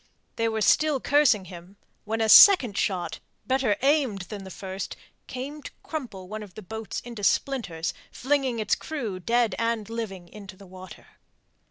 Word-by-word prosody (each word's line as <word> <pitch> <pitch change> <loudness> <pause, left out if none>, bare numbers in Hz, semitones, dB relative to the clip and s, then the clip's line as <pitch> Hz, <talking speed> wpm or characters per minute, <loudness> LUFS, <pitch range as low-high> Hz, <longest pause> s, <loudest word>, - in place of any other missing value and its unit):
They 230 0 0
were 220 -1 -2
still 300 +5 +3
cursing 270 -9 +3
him 180 +2 -12 0.3
when 225 +1 -2
a 220 - +2
second 250 - +8
shot, 185 -4 -2 0.3
better 260 -5 +1
aimed 270 -9 +2
than 200 0 -8
the - - -9
first, 190 0 -6 0.3
came 280 +4 -6
to - - -8
crumple 235 - -6
one 215 +2 -6
of 200 -4 -12
the 215 - -9
boats 220 +3 -6
into 235 -4 -9
splinters, 180 -10 0 0.2
flinging 265 -2 0
its 215 -2 0
crew, 235 -12 -4
dead 230 +4 +1
and 230 -2 -1
living, 195 -6 -5
into 195 -1 -12
the 200 - -14
water. 185 0 -12
220 Hz, 165 wpm, -26 LUFS, 190-255 Hz, 0.3 s, second